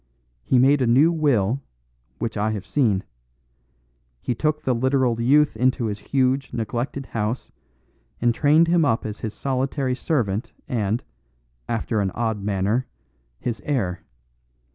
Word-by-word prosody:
He 130 Hz, -, +2 dB
made 135 Hz, +3 st, +5 dB
a 125 Hz, -, +2 dB
new 140 Hz, +8 st, +5 dB
will, 135 Hz, -, +1 dB, 0.6 s
which 115 Hz, +9 st, -3 dB
I 110 Hz, +1 st, 0 dB
have 100 Hz, -4 st, -5 dB
seen. 110 Hz, -9 st, +1 dB, 1.2 s
He 125 Hz, -, -2 dB
took 150 Hz, +5 st, -1 dB
the 130 Hz, -, +1 dB
literal 130 Hz, -1 st, +1 dB
youth 145 Hz, +3 st, +4 dB
into 125 Hz, +1 st, +1 dB
his 105 Hz, -1 st, -3 dB
huge, 135 Hz, +3 st, 0 dB
neglected 120 Hz, +4 st, -3 dB
house, 115 Hz, +1 st, -3 dB, 0.7 s
and 120 Hz, 0 st, +2 dB
trained 150 Hz, +6 st, +4 dB
him 170 Hz, -1 st, +3 dB
up 115 Hz, -6 st, +1 dB
as 110 Hz, -1 st, -5 dB
his 110 Hz, -2 st, -5 dB
solitary 130 Hz, 0 st, -1 dB
servant 120 Hz, -6 st, -1 dB
and 110 Hz, -1 st, -1 dB, 0.7 s
after 115 Hz, -1 st, 0 dB
an 95 Hz, -, 0 dB
odd 110 Hz, -3 st, -1 dB
manner 105 Hz, +4 st, 0 dB, 0.5 s
his 120 Hz, -2 st, -3 dB
heir. 95 Hz, -11 st, -1 dB
120 Hz, 140 wpm, -23 LUFS, 110-135 Hz, 1.2 s, made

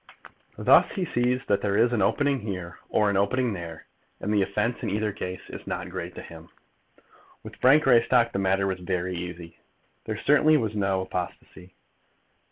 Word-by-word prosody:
Thus -, -, +5 dB
he 190 Hz, -4 st, -2 dB
sees 125 Hz, -2 st, 0 dB
that 100 Hz, -1 st, +1 dB
there 100 Hz, -1 st, 0 dB
is 120 Hz, +2 st, +3 dB
an 115 Hz, -, +1 dB
opening 140 Hz, +7 st, +1 dB
here 90 Hz, -5 st, -6 dB
or 105 Hz, -1 st, +2 dB
an 100 Hz, -, 0 dB
opening 115 Hz, +4 st, +1 dB
there, 85 Hz, -3 st, -8 dB, 0.3 s
and 105 Hz, -, -2 dB
the 105 Hz, -, +3 dB
offence 105 Hz, +5 st, -1 dB
in -, -, -2 dB
either 105 Hz, +1 st, -1 dB
case 90 Hz, -2 st, -7 dB
is -, -, -9 dB
not -, -, -4 dB
great -, -, -6 dB
to -, -, -8 dB
him. 80 Hz, 0 st, -12 dB, 0.9 s
With -, -, -11 dB
Frank 140 Hz, +4 st, +5 dB
Greystock 120 Hz, -2 st, +4 dB
the -, -, -1 dB
matter 95 Hz, 0 st, +1 dB
was 95 Hz, -1 st, -2 dB
very 90 Hz, 0 st, -2 dB
easy. 85 Hz, -1 st, -7 dB, 0.5 s
There 110 Hz, -1 st, -4 dB
certainly 150 Hz, +5 st, +4 dB
was 110 Hz, -5 st, -2 dB
no 95 Hz, -2 st, 0 dB
apostasy. 90 Hz, 0 st, -7 dB
100 Hz, 175 wpm, -26 LUFS, 90-120 Hz, 0.9 s, Thus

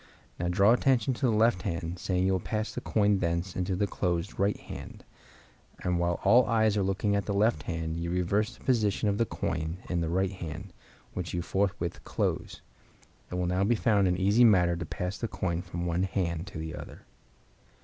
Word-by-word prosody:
Now 85 Hz, -, -1 dB
draw 100 Hz, +5 st, +4 dB
attention 130 Hz, -1 st, +2 dB
to 125 Hz, +2 st, 0 dB
the -, -, +3 dB
left 110 Hz, -3 st, +3 dB
hand, 85 Hz, -1 st, -3 dB
saying 90 Hz, 0 st, 0 dB
you 95 Hz, -, +3 dB
will 95 Hz, -, +1 dB
pass 110 Hz, +3 st, -3 dB
the -, -, -4 dB
coin 105 Hz, -2 st, +2 dB
thence 85 Hz, +1 st, -1 dB
into 90 Hz, +1 st, -1 dB
the 100 Hz, +3 st, +1 dB
closed 90 Hz, -2 st, -2 dB
right 100 Hz, +1 st, +2 dB
hand; -, -, -10 dB, 0.8 s
and 90 Hz, -1 st, +1 dB
while 85 Hz, 0 st, 0 dB
all 125 Hz, +1 st, +6 dB
eyes 110 Hz, -2 st, +3 dB
are 105 Hz, -, +2 dB
looking 95 Hz, +2 st, 0 dB
at 100 Hz, -2 st, -1 dB
the 100 Hz, -, -1 dB
left 105 Hz, -6 st, +2 dB
hand 80 Hz, 0 st, -3 dB
you 85 Hz, 0 st, -3 dB
reverse 100 Hz, +6 st, 0 dB
the -, -, -19 dB
position 110 Hz, -4 st, +1 dB
of 100 Hz, -, -1 dB
the 115 Hz, -, +2 dB
coin 80 Hz, +1 st, -3 dB
in 85 Hz, -1 st, 0 dB
the 80 Hz, -, -1 dB
right 95 Hz, +2 st, +1 dB
hand, 90 Hz, 0 st, -7 dB, 0.4 s
which 90 Hz, -1 st, -4 dB
you 85 Hz, -, -1 dB
forthwith 95 Hz, -2 st, -1 dB
close. -, -, -2 dB, 0.7 s
It -, -, -5 dB
will 90 Hz, 0 st, 0 dB
now 90 Hz, +2 st, +1 dB
be 115 Hz, +4 st, +3 dB
found 105 Hz, -4 st, +3 dB
an 90 Hz, -1 st, +1 dB
easy 100 Hz, +5 st, +4 dB
matter 90 Hz, -6 st, +5 dB
to 85 Hz, +1 st, -4 dB
pass 90 Hz, +4 st, -4 dB
the 115 Hz, -, -2 dB
coin 95 Hz, -4 st, -2 dB
from 85 Hz, -1 st, -5 dB
one 85 Hz, +1 st, 0 dB
hand 90 Hz, -2 st, -1 dB
to -, -, -8 dB
the 80 Hz, 0 st, -5 dB
other. -, -, -10 dB
95 Hz, 210 wpm, -29 LUFS, 85-105 Hz, 0.8 s, all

